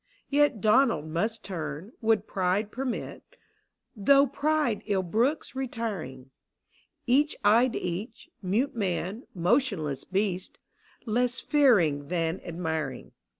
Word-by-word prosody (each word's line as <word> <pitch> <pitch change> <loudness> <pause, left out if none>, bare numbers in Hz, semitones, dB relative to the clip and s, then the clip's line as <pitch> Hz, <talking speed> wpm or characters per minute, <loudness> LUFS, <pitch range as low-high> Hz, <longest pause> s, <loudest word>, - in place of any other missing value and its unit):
Yet 290 -7 +3
Donald 220 - +3
must 210 +8 -2
turn, 165 +1 -5
would 220 -2 +2
pride 195 +2 0
permit, 255 -1 -4 0.7
Though 275 +7 +5
pride 290 -3 0
ill 195 -2 +1
brooks 235 - 0
retiring: 205 - -5 0.7
Each 285 +5 +3
eyed 235 +4 +4
each 195 - -5
— - - -46
mute 245 +7 +1
man, 195 +2 -2
motionless 180 - 0
beast 190 -1 -2 0.3
— - - -31
Less 245 +2 0
fearing 180 - +3
than 165 +1 -1
admiring. 160 -5 -4
210 Hz, 110 wpm, -27 LUFS, 175-250 Hz, 0.7 s, Though